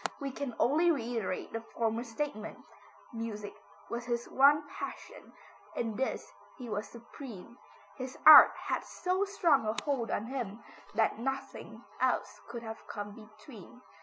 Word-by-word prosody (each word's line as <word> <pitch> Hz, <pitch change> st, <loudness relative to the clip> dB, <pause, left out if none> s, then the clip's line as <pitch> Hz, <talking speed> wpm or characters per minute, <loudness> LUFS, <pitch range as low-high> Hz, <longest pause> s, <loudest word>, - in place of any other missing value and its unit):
We 275 Hz, -1 st, -3 dB
can 260 Hz, -3 st, -5 dB
only 315 Hz, +7 st, +3 dB
reiterate 235 Hz, -, -2 dB
the 225 Hz, -, -3 dB
former 230 Hz, 0 st, -2 dB
statement, 230 Hz, -2 st, -5 dB, 0.6 s
music 220 Hz, -3 st, -5 dB, 0.3 s
was 235 Hz, +1 st, -4 dB
his 240 Hz, -1 st, -2 dB
one 290 Hz, +2 st, +5 dB
passion, -, -, -8 dB, 0.4 s
in 225 Hz, -2 st, -2 dB
this 265 Hz, -, -3 dB, 0.3 s
he 250 Hz, -, -8 dB
was 205 Hz, -1 st, -3 dB
supreme. 235 Hz, -1 st, -11 dB, 0.4 s
His 260 Hz, -1 st, -6 dB
art 310 Hz, -1 st, +12 dB
had -, -, -1 dB
so 370 Hz, +2 st, -1 dB
strong 330 Hz, -, +2 dB
a 215 Hz, -, 0 dB
hold 270 Hz, -6 st, -1 dB
on 210 Hz, -, -1 dB
him 235 Hz, -4 st, -5 dB, 0.3 s
that 220 Hz, 0 st, +2 dB
nothing 270 Hz, +3 st, -5 dB, 0.2 s
else -, -, 0 dB
could 235 Hz, 0 st, -7 dB, 0.2 s
come 205 Hz, -1 st, -6 dB
between. 215 Hz, -, -14 dB
235 Hz, 135 wpm, -31 LUFS, 220-275 Hz, 0.6 s, art